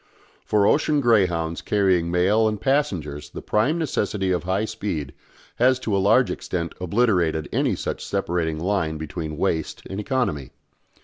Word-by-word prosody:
For 105 -1 +2
ocean 150 +4 +3
greyhounds 90 -10 +2
carrying 95 -5 +2
mails 100 +6 +3
and 105 -1 -4
passengers 80 - -1
the - - -8
prime 115 +10 +1
necessity 105 - -1
of 90 -1 -1
high 95 +4 0
speed 100 -10 -4 0.4
has 130 +1 +4
to 110 -5 -1
a - - +2
large 110 +6 +4
extent 85 -2 -4
obliterated 90 -6 +1
any - - +1
such - - -4
separating 80 -3 -1
line 85 -3 -1
between 80 0 -5
waste 80 -3 -1
and 95 - -5
economy. 105 - -1
95 Hz, 145 wpm, -23 LUFS, 80-110 Hz, 0.4 s, has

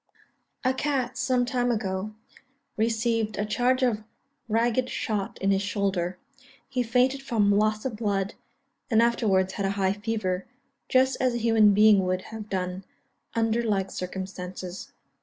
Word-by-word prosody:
A 255 0 +2
cat, 260 -2 -1
some 255 -2 +1
time 245 -1 0
ago, 210 -2 -2 0.6
received 225 -1 0
a 205 - 0
charge 250 +5 +1
of 220 -4 +1 0.5
ragged 235 +3 +1
shot 210 -4 -3
in 195 0 +2
his 195 0 +2
shoulder. 190 -3 -1 0.5
He 265 -2 -1
fainted 250 +3 +2
from 220 -6 +2
loss 215 +2 +1
of 240 -5 -3
blood, 200 -3 -1 0.6
and 225 - +4
afterwards 205 -5 +2
had 200 - -2
high 195 -1 +1
fever, 205 -3 -2 0.4
just 260 +1 +3
as 255 -2 +2
a - - +1
human 225 -3 +4
being 210 -2 +6
would 185 0 -1
have 215 -1 -7
done, 185 0 -3 0.5
under 225 0 +2
like 195 -4 0
circumstances. 185 0 -6
215 Hz, 140 wpm, -26 LUFS, 195-240 Hz, 0.6 s, being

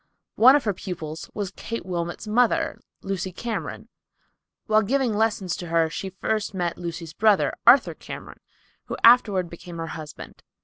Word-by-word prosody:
One 255 +4 +7
of 290 - +2
her 210 - 0
pupils 160 -5 -7
was 200 -3 -3
Kate 230 -5 -5
Wilmot's 175 0 -4
mother, 235 +2 +2 0.2
Lucy 190 -1 -3
Cameron. 230 +5 -5 0.8
While 215 -1 +4
giving 255 +2 +1
lessons 210 -5 0
to 175 - -7
her 165 -1 +2
she 190 - -4
first 205 +2 -2
met 175 -2 -1
Lucy's 170 -2 -6
brother, 210 +1 +3
Arthur 255 +3 +7
Cameron, - - -10 0.5
who - - -5
afterward 210 -6 +6
became 170 0 -10
her 165 - -3
husband. 155 -1 -9
190 Hz, 150 wpm, -24 LUFS, 170-220 Hz, 0.8 s, One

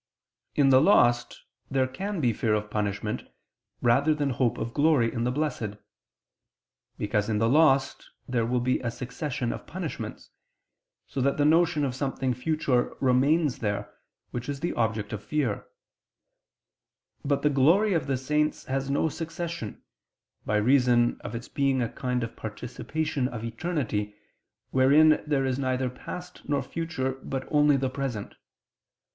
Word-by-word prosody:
In 140 -2 +4
the 130 0 +7
lost 120 -9 +3 0.3
there 135 -1 +2
can 190 +9 -4
be 120 -4 +2
fear 110 0 +1
of 105 0 -3
punishment, 105 0 -2 0.6
rather 140 +6 +4
than 145 -2 0
hope 120 -1 +1
of 115 - -4
glory 145 -7 +3
in 115 -1 -1
the 125 - +1
Blessed. 125 -7 -2 1.2
Because 105 0 -1
in 110 - +1
the 115 +1 +2
lost 135 0 +3 0.2
there 125 -3 0
will 120 +2 0
be 130 +1 +1
a 120 - -2
succession 125 +1 -3
of - - -9
punishments, - - -6 0.7
so 135 - -4
that 140 +2 +1
the 145 - +3
notion 160 -1 +3
of 130 - -2
something 130 -1 -1
future 130 -1 0
remains 140 +3 +2
there, 100 -1 -3 0.4
which 120 +2 -5
is 140 -1 -4
the 170 - -1
object 110 -2 -1
of 105 -1 -5
fear: 125 -3 -1 1.6
but 140 -1 0
the 150 - +3
glory 170 +10 +4
of 155 -6 0
the 135 -1 0
saints 150 +4 0
has 135 +1 -2
no 140 +3 +2
succession, 165 -6 -5 0.6
by 105 - +1
reason 120 +1 +3
of - - -5
its 115 +1 -6
being 135 -2 +1
a 120 - +1
kind 125 -1 -2
of 115 - -6
participation 130 +6 -3
of 120 -4 -6
eternity, 115 -5 -2 0.6
wherein 145 +4 +5
there 140 -3 +1
is 130 0 -1
neither 130 -1 0
past 180 +7 -8
nor 140 -2 +1
future, 135 -6 -3
but 135 0 -4
only 150 -2 +5
the 135 0 0
present. 130 -5 -4
130 Hz, 150 wpm, -27 LUFS, 120-150 Hz, 1.6 s, the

